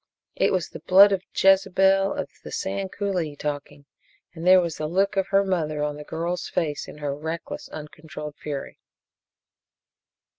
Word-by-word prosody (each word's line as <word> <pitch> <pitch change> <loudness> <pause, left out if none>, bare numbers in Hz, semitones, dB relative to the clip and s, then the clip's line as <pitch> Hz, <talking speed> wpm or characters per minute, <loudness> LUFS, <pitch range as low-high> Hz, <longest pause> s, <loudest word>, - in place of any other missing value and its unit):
It - - +2
was 180 -7 0
the - - -9
blood 195 +5 +7
of 195 -2 +1 0.2
Jezebel 195 0 +4
of - - -3 0.2
the - - -9
Sand 195 0 -3
Coulee 180 -7 -2
talking, 145 0 -5 0.5
and 170 +1 -5
there 185 0 +8
was 170 -3 -2
the 155 - -2
look 195 +5 +1
of 195 -1 +1
her 195 0 +3
mother 155 -6 -1
on 150 0 -2
the 150 - -8
girl's 170 +4 -3
face, 150 -4 -2
in - - -10
her 145 -2 -3
reckless, 160 +3 -6
uncontrolled 150 -1 -8
fury. 145 -2 -6
170 Hz, 160 wpm, -25 LUFS, 150-190 Hz, 0.5 s, there